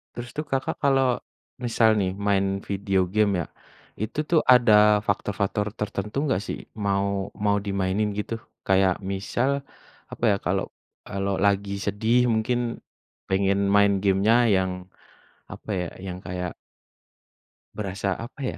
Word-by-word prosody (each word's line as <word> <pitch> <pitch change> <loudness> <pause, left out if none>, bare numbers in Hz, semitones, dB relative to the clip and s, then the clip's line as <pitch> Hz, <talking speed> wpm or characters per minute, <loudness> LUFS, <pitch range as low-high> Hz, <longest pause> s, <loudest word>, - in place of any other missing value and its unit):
Terus 120 0 -6
tuh 150 - -2
Kakak 135 -2 -2
kalau 135 -3 +3 0.5
misal 115 -1 +3
nih 95 -1 0 0.2
main 100 -1 +3 0.2
video 100 -1 -1
game 105 -1 +3
ya, - - -4 0.6
itu 110 +7 -4
tuh 170 - +5
ada 105 -4 +6
faktor-faktor 100 0 -1
tertentu 105 +2 -3
enggak 130 -10 0
sih - - -3 0.3
mau 100 0 -1
mau 100 0 +3
dimainin 100 +1 0
gitu? 105 - -3 0.3
Kayak 95 -1 +3
misal 120 +7 -1 0.6
apa - - -9
ya, - - +3
kalau 95 +2 0 0.4
kalau 100 0 -2
lagi 100 0 +1
sedih 115 +4 +2
mungkin 120 +2 -1 0.5
pengen 95 +1 +2 0.2
main 100 0 +5
game-nya 100 +3 +3 0.2
yang 95 0 +1 0.8
apa - - -11
ya, 90 - -2 0.2
yang 90 -1 -5
kayak 90 -1 -4 1.2
berasa 95 -2 -2
apa 120 +6 -9
ya? - - -3
100 Hz, 130 wpm, -25 LUFS, 95-115 Hz, 1.2 s, ada